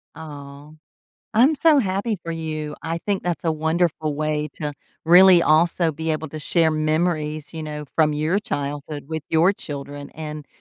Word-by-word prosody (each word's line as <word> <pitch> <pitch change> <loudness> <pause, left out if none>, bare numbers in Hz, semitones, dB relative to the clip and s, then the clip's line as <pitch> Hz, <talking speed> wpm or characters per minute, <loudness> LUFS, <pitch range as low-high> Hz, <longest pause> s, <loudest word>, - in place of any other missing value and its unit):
Aw. 145 -2 -10 0.7
I'm 260 +8 +5
so 305 0 +4
happy 200 0 -1
for 165 - -3
you. 155 -2 -4
I 165 +1 -2
think 200 +2 -2
that's 175 -3 -3
a 160 - +2
wonderful 160 -1 0
way 150 0 -1
to 150 -1 -4 0.3
really 180 +1 +7
also 165 +1 +3
be 160 +2 -3
able 155 0 -2
to 155 - -6
share 160 +1 +2
memories, 155 -1 -1
you 160 -1 -6
know, 150 -1 -6
from 155 -2 +3
your 155 +6 +1
childhood 145 -4 -4
with 160 -1 -4
your 165 +5 +4
children 145 -4 -8
and 150 -1 -7
155 Hz, 165 wpm, -22 LUFS, 150-170 Hz, 0.7 s, really